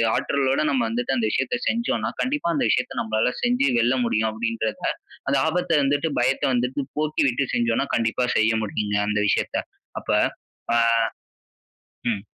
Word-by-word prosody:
ஆற்றலோட 135 +1 +1
நம்ம 130 -4 +1
வந்துட்டு 125 +3 -1
அந்த 115 - +1
விஷயத்த 135 - 0
செஞ்சோனா 235 +1 0
கண்டிப்பா 275 -7 -1
அந்த - - +1
விஷயத்த 125 - 0
நம்மளால 110 +2 0
செஞ்சு 245 - +2
வெல்ல 120 +3 +2
முடியும், 110 -1 +1
அப்படின்றத 110 -1 -2 0.5
அந்த 140 - +3
ஆபத்த 180 +1 -1
வந்துட்டு, 145 +3 +1
பயத்த 130 +2 +1
வந்துட்டு 125 +3 0 0.2
போக்கிவிட்டு 140 -4 +1
செஞ்சோனா 120 +3 +1
கண்டிப்பா 115 +2 +1
செய்ய 110 +1 +3
முடியுங்க, 105 -1 -1
அந்த 105 0 0
விஷயத்த. - - 0 0.4
அப்ப - - -14 0.6
பா 120 - +3 1.3
ம். 100 -1 -4
125 Hz, 140 wpm, -23 LUFS, 115-140 Hz, 1.3 s, அந்த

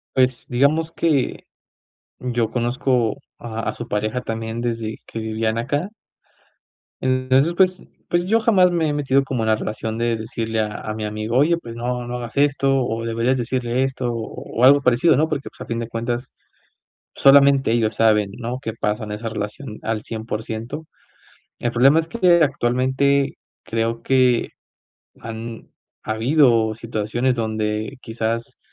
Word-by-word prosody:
Pues 130 -2 +2
digamos 150 +6 +2
que, 150 -6 0 0.8
yo 120 -3 -1
conozco 120 -1 0 0.2
a 115 -1 -6
a - - -3
su 120 - -7
pareja 110 +4 -1
también, 115 0 -4
desde 115 -2 -2
que 115 - -6
vivían 110 0 -1
acá 145 - -1 1.1
entonces, 130 +5 +2
pues 185 0 +2 0.3
pues 175 +1 +1
yo 225 +3 +3
jamás 190 -5 +4
me 165 -3 +1
he - - 0
metido 140 -2 +2
como 125 -4 -2
en - - -1
la 110 - +4
relación 110 +1 -4
de 115 0 0
decirle 110 0 -3
a 105 - 0
a 110 - -4
mi 110 -1 -4
amigo, 110 +3 -2
oye, 165 +4 +4
pues 115 -7 -9
no, 120 0 -3
no 120 0 -4
hagas 120 +2 -7
esto, 135 -2 +2
o 115 0 -3
deberías 115 +3 +1
decirle 125 +1 -1
esto, 125 -2 -2
o 115 +1 -5
algo 140 +1 +7
parecido, 125 +5 +4
¿no?, 155 +2 +2
porque, 145 -3 -3
pues, - - -24
a - - -9
fin 115 - -3
de 115 -1 -4
cuentas, 120 +2 -3 0.9
solamente 140 -2 +6
ellos 110 -2 +1
saben, 105 -3 +3
¿no?, 125 +2 -4
qué 115 - -3
pasa 105 0 -2
en 105 - -6
esa 110 +2 -4
relación 110 +2 -6
al 110 -1 -2
100%. 110 +6 -5 0.7
El 120 - -1
problema 135 +6 +5
es 165 - 0
que 180 -7 +4
actualmente, 135 +2 +1 0.3
creo 115 +1 -2
que 130 -3 +3 0.7
han 115 0 -7 0.3
habido 115 -1 +3
situaciones 115 +3 -1
donde 110 +2 -2
quizás 115 0 -3
120 Hz, 155 wpm, -21 LUFS, 110-135 Hz, 1.1 s, algo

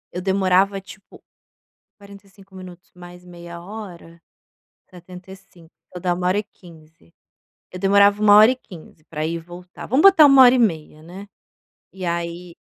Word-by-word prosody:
Eu 180 - -6
demorava, 195 +1 0
tipo, 190 0 -17 0.8
45 200 -1 -18
minutos 180 -1 -14
mais 180 0 -15
meia 170 -1 -12
hora, 175 -4 -12 0.7
75. 180 -1 -16 0.2
Vai 180 - -9
dar 180 -1 -1
1h15. 175 - -7 0.6
Eu 180 - -10
demorava 200 +2 +2
1h15 210 -7 +1
pra 155 -1 -7
ir 165 +1 -4
e - - -5
voltar. 175 +2 -13
Vamos 265 +6 0
botar 380 -6 +6
1h30, 245 - +3
né. 185 +5 -13 0.6
E 190 -1 -9
aí 170 0 -6
180 Hz, 120 wpm, -19 LUFS, 170-200 Hz, 0.8 s, botar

